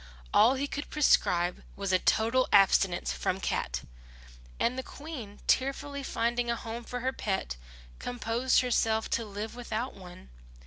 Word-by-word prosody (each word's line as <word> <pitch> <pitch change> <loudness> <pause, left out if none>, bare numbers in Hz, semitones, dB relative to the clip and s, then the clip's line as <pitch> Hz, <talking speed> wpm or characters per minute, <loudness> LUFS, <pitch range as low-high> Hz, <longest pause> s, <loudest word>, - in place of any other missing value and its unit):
All 240 +5 +6
he 275 +2 -1
could 285 0 -5
prescribe 180 - +2
was 195 -1 -2
a 185 - +5
total 230 +7 +2
abstinence 195 -2 +4
from 185 - -1
cat; - - -2 0.8
and 240 - +1
the 260 - -2
Queen, 260 -8 -9
tearfully 280 +2 0
finding 240 -2 -1
a 235 - +1
home 230 +1 -6
for 245 +1 -5
her 260 +1 0
pet, 190 - -2 0.4
composed 245 +1 +1
herself 225 -3 +1
to 230 - +1
live 210 +1 -6
without 245 +1 -3
one. 180 - -13
235 Hz, 145 wpm, -29 LUFS, 200-255 Hz, 0.8 s, All